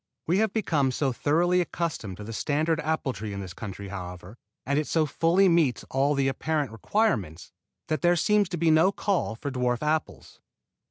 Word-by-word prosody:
We 180 Hz, +5 st, +2 dB
have 220 Hz, -2 st, +2 dB
become 160 Hz, -11 st, +1 dB
so 135 Hz, 0 st, 0 dB
thoroughly 175 Hz, +7 st, +2 dB
accustomed 155 Hz, -, -4 dB
to 105 Hz, -, -8 dB
the 115 Hz, +2 st, -7 dB
standard 155 Hz, +6 st, 0 dB
apple 155 Hz, -4 st, -1 dB
tree 105 Hz, +1 st, -6 dB
in 100 Hz, -, -5 dB
this 95 Hz, -2 st, -7 dB
country, 100 Hz, 0 st, -7 dB
however, 90 Hz, +1 st, -8 dB, 0.3 s
and 140 Hz, +2 st, +1 dB
it 150 Hz, -, -2 dB
so 160 Hz, -2 st, +2 dB
fully 165 Hz, +6 st, +3 dB
meets 165 Hz, -8 st, +2 dB
all 140 Hz, +2 st, +2 dB
the 135 Hz, -1 st, +1 dB
apparent 145 Hz, 0 st, -1 dB
requirements, 110 Hz, -, -1 dB, 0.4 s
that 155 Hz, -, -1 dB
there 175 Hz, 0 st, +4 dB
seems 205 Hz, +3 st, +2 dB
to 175 Hz, -, -3 dB
be 165 Hz, 0 st, +3 dB
no 160 Hz, +5 st, +5 dB
call 195 Hz, -, -1 dB
for 140 Hz, +5 st, -5 dB
dwarf 125 Hz, -1 st, -1 dB
apples. 155 Hz, +1 st, -2 dB
150 Hz, 185 wpm, -26 LUFS, 115-170 Hz, 0.4 s, no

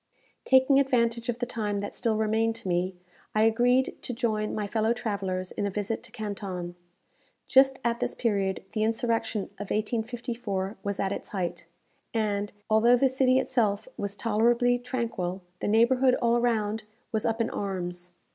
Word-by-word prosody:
Taking 265 Hz, +1 st, +5 dB
advantage 235 Hz, -3 st, +1 dB
of 240 Hz, -, 0 dB
the 245 Hz, -, -1 dB
time 210 Hz, -4 st, -2 dB
that 205 Hz, -, -5 dB
still 225 Hz, -2 st, 0 dB
remained 220 Hz, +1 st, +1 dB
to 230 Hz, -3 st, -7 dB
me, 180 Hz, +1 st, 0 dB, 0.4 s
I 215 Hz, -, +4 dB
agreed 245 Hz, +3 st, +3 dB
to 245 Hz, -, -5 dB
join 215 Hz, -3 st, -1 dB
my 210 Hz, -, -1 dB
fellow 220 Hz, +2 st, +1 dB
travellers 195 Hz, -5 st, -3 dB
in 205 Hz, -, -2 dB
a -, -, -1 dB
visit 205 Hz, +3 st, -3 dB
to 230 Hz, -, -11 dB
Canton. 200 Hz, -6 st, -5 dB, 0.7 s
Just 265 Hz, 0 st, +5 dB
at 235 Hz, 0 st, +1 dB
this -, -, -2 dB
period 200 Hz, -4 st, 0 dB
the 215 Hz, -, -2 dB
insurrection 225 Hz, -1 st, 0 dB, 0.2 s
of 205 Hz, -, -6 dB
1854 225 Hz, -2 st, -2 dB
was 200 Hz, 0 st, -3 dB
at 195 Hz, -, 0 dB
its -, -, -4 dB
height, 175 Hz, -3 st, -3 dB, 0.5 s
and, 205 Hz, -2 st, 0 dB, 0.2 s
although 230 Hz, +3 st, +5 dB
the 265 Hz, +2 st, +3 dB
city 260 Hz, 0 st, +3 dB
itself 225 Hz, -6 st, +1 dB
was 200 Hz, 0 st, -4 dB
tolerably 235 Hz, +3 st, +2 dB
tranquil, 230 Hz, -7 st, -3 dB, 0.2 s
the -, -, -2 dB
neighbourhood 250 Hz, +4 st, +4 dB
all 235 Hz, -2 st, +2 dB
around 225 Hz, -3 st, +1 dB, 0.3 s
was 220 Hz, -2 st, 0 dB
up 225 Hz, 0 st, 0 dB
in 230 Hz, -, 0 dB
arms. 180 Hz, -3 st, -4 dB
220 Hz, 165 wpm, -28 LUFS, 200-240 Hz, 0.7 s, Taking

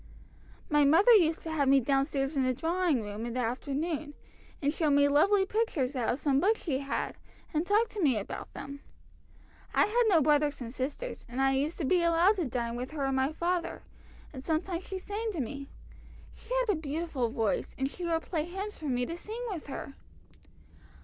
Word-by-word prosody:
"My 295 Hz, -1 st, +4 dB
mother 330 Hz, -, +6 dB
used 335 Hz, -7 st, +5 dB
to 320 Hz, -, -5 dB
have 290 Hz, -3 st, +1 dB
me 275 Hz, 0 st, +6 dB
down 270 Hz, +2 st, +2 dB
stairs 275 Hz, 0 st, -2 dB
in 275 Hz, -, +2 dB
the 255 Hz, -1 st, +1 dB
drawing 330 Hz, -5 st, +1 dB
room 205 Hz, +1 st, -6 dB
in 235 Hz, 0 st, -4 dB
the -, -, -1 dB
afternoon, 290 Hz, +5 st, -2 dB, 0.4 s
and 285 Hz, 0 st, 0 dB
show 315 Hz, -2 st, +1 dB
me 285 Hz, 0 st, +5 dB
lovely 385 Hz, +8 st, +4 dB
pictures 365 Hz, -, -1 dB
out 245 Hz, -3 st, 0 dB
of 245 Hz, -, +1 dB
some 280 Hz, -2 st, +2 dB
books 425 Hz, +7 st, +2 dB
she 275 Hz, -6 st, -1 dB
had, 280 Hz, 0 st, -3 dB, 0.3 s
and 315 Hz, +3 st, 0 dB
talk 425 Hz, +3 st, +3 dB
to 420 Hz, -, -4 dB
me 270 Hz, -8 st, +3 dB
about 200 Hz, -, -6 dB
them. 280 Hz, +1 st, -7 dB, 1.0 s
I -, -, +5 dB
had 475 Hz, +4 st, +2 dB
no 365 Hz, -6 st, +5 dB
brothers 295 Hz, 0 st, +2 dB
and 240 Hz, -2 st, -6 dB
sisters, 285 Hz, -, -4 dB
and 245 Hz, +2 st, -5 dB
I 270 Hz, 0 st, +4 dB
used 285 Hz, +5 st, 0 dB
to 315 Hz, -, -2 dB
be 355 Hz, +6 st, +3 dB
allowed 340 Hz, +5 st, +4 dB
to 350 Hz, -, 0 dB
dine 235 Hz, -2 st, -2 dB
with 250 Hz, +2 st, -4 dB
her 285 Hz, -3 st, -1 dB
and 270 Hz, 0 st, 0 dB
my 265 Hz, +2 st, +1 dB
father, 345 Hz, +2 st, -2 dB, 0.5 s
and 260 Hz, -2 st, -8 dB
sometimes 335 Hz, +4 st, -2 dB
she 385 Hz, -, -5 dB
sang 420 Hz, +4 st, -3 dB
to 340 Hz, -, -4 dB
me. 275 Hz, +2 st, -5 dB, 0.6 s
She 460 Hz, -, -18 dB
had 485 Hz, -4 st, +1 dB
a -, -, -5 dB
beautiful 295 Hz, -4 st, -2 dB
voice, 225 Hz, -3 st, -1 dB
and 265 Hz, -, 0 dB
she 350 Hz, +6 st, -8 dB
would 330 Hz, -1 st, 0 dB
play 315 Hz, -4 st, -2 dB
hymns 390 Hz, +4 st, -5 dB
for 310 Hz, -, -8 dB
me 245 Hz, -1 st, +1 dB
to 335 Hz, -, -5 dB
sing 440 Hz, +7 st, -6 dB
with 335 Hz, -7 st, -6 dB
her." 275 Hz, 0 st, -6 dB
300 Hz, 210 wpm, -30 LUFS, 270-350 Hz, 1.0 s, mother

